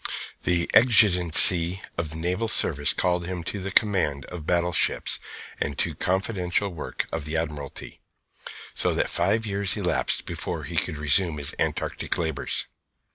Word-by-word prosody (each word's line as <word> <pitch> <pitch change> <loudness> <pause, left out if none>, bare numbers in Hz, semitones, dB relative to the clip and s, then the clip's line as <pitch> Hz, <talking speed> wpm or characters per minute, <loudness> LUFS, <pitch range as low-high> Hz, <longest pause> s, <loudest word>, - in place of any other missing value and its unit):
The 85 -1 +1
exigencies 90 -6 +6 0.2
of 85 -2 -3
the 80 - -9
naval 90 +7 -3
service 75 -9 +4
called 90 -1 -1
him 90 -2 -5
to 100 - -5
the 95 +1 -6
command 90 - +1
of 80 -3 -9
battleships 90 0 +1 0.4
and 70 0 -3
to - - -1
confidential 95 0 -1
work 80 - -5
of 80 - -4
the 80 +1 -3
Admiralty; 75 -4 -7 0.7
so - - -1
that - - -1
five 110 0 0
years 100 -3 -2
elapsed - - -1
before - - -5
he - - -8
could 75 - 0
resume 75 +3 +2
his 70 -1 0
Antarctic - - 0
labours. 80 -6 -2
85 Hz, 145 wpm, -24 LUFS, 80-95 Hz, 0.7 s, exigencies